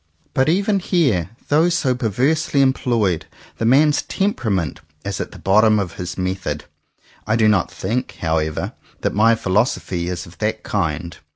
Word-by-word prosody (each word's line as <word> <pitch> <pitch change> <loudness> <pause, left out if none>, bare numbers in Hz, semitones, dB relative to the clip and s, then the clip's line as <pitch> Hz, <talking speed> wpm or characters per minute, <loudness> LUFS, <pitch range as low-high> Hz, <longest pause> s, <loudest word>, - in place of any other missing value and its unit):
But 130 +3 +2
even 200 +4 +2
here, 135 - +1 0.2
though 160 +4 +4
so 160 -7 +1
perversely 135 +5 +1
employed, 115 -9 +1 0.3
the 115 - 0
man's 145 +5 +4
temperament 105 - -1 0.2
is 100 -1 -3
at - - -5
the - - -11
bottom 110 +3 +4
of 95 -5 -3
his 90 0 -5
method. 95 -5 -3 0.6
I 110 - +2
do 110 -2 +4
not 100 -4 +3
think, 120 +7 -3
how 80 -1 +1
ever, 80 -1 -3 0.3
that - - 0
my 115 +2 +4
philosophy 95 -4 0
is 90 -1 -4
of 85 - -16
that 110 0 -1
kind. 85 -4 -2
110 Hz, 160 wpm, -20 LUFS, 90-130 Hz, 0.6 s, though